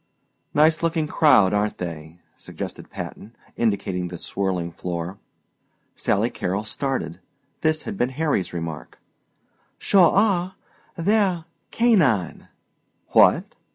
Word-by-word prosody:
"Nice 155 +2 +4
looking 165 -1 0
crowd 130 - +4
aren't 105 +1 0
they?" 80 -1 -7
suggested - - -8
Patton, 110 +4 -8 0.2
indicating 95 -5 -1
the 90 0 -7
swirling 90 -2 -2
floor. 85 +2 -5 0.8
Sally - - 0
Carrol 95 +4 -2
started. 110 - -3 0.4
This 155 0 +1
had 205 -3 -6
been 125 - +2
Harry's 150 - 0
remark. 80 -6 -6 0.8
"Sure 185 -5 +5
are! 190 -3 +2 0.4
They're 185 -2 +1 0.2
canine." 160 - +2 0.6
"What?" - - +4
115 Hz, 105 wpm, -23 LUFS, -, 0.8 s, Sure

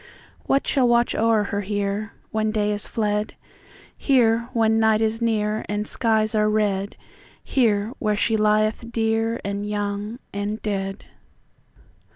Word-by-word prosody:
What 275 - +2
shall 265 -4 +2
watch 240 0 +3
o'er 225 -1 +2
her 205 0 -2
hereWhen 210 +2 -3
day 210 -1 0
is 205 0 -1
fled? 210 -1 -1 0.6
Here, 235 -3 +2
when 225 -2 +2
the 220 - +2
night 220 -1 +3
is 220 0 0
nearAnd 215 -2 -1
skies 220 -1 +1
are 215 -1 +2
red; 205 -2 0 0.5
Here, 220 -3 +1
where 210 -2 0
she 225 +1 +1
lieth 215 +2 +1
dearAnd 225 -2 -1
young 205 +2 -3 0.2
and 205 +2 -3
dead. 195 -1 -3
215 Hz, 130 wpm, -23 LUFS, 205-225 Hz, 0.6 s, watch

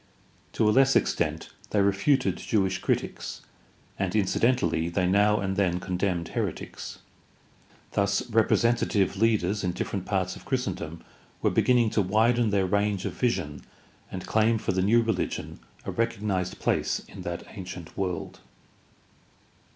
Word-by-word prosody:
To 110 - +2
a - - +5
less 135 +2 +5
extent 80 -1 0 0.2
they 105 - +1
refuted 100 +8 +2
Jewish 95 -4 0
critics, - - -2 0.6
and 95 -1 -1
incidentally 95 -5 +2
they 90 +1 0
now 105 +3 +3
and 95 -1 -1
then 90 -3 +1
condemned 90 -1 -2
heretics. - - -4 0.9
Thus 100 0 +1
representative 110 -2 +2
leaders 105 -2 +1
in 90 -1 0
different 95 +1 -4
parts 95 -2 0
of - - -12
Christendom 90 - -3 0.4
were - - +3
beginning 120 -3 +3
to 105 - +2
widen 110 +4 +3
their 100 -2 +2
range 100 0 0
of - - -2
vision 75 - -1 0.5
and 90 -1 -5
claim 110 +1 +3
for 105 - -1
the 95 0 0
new 115 +5 +4
rehgion 115 - -2 0.3
a - - -3
recog 115 0 0
nized 95 -4 -1
place - - 0
in - - -10
that 85 0 -4
ancient 90 -4 -8
world. 95 -3 -3
100 Hz, 140 wpm, -27 LUFS, 90-110 Hz, 0.9 s, a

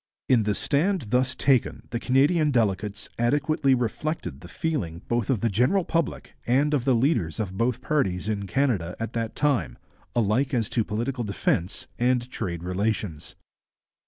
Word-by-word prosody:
In 125 -3 +5
the 105 -1 +1
stand 160 - +1
thus 130 +1 +2
taken 135 -4 +2
the 115 - -1
Canadian 150 +6 +3
delegates 105 -4 0
adequately 140 +2 +2
reflected 125 - -3
the 90 - -10
feeling 95 - -3
both 120 -3 0
of 125 -7 +1
the 115 - +2
general 130 - +2
public 165 0 -2
and 140 +5 +3
of 135 -4 +1
the 130 -3 +4
leaders 115 - +1
of 95 -4 -3
both 120 +3 0
parties 105 - 0
in 100 -2 -2
Canada 95 -7 0
at 115 +1 -4
that 115 -1 -3
time, 145 -4 0 0.4
alike 120 +5 +2
as 115 -3 0
to 115 - +1
political 120 +4 -2
defence 100 -2 -1
and 125 0 +2
trade 85 -2 -4
relations. 90 -3 -2
120 Hz, 160 wpm, -26 LUFS, 100-140 Hz, 0.4 s, In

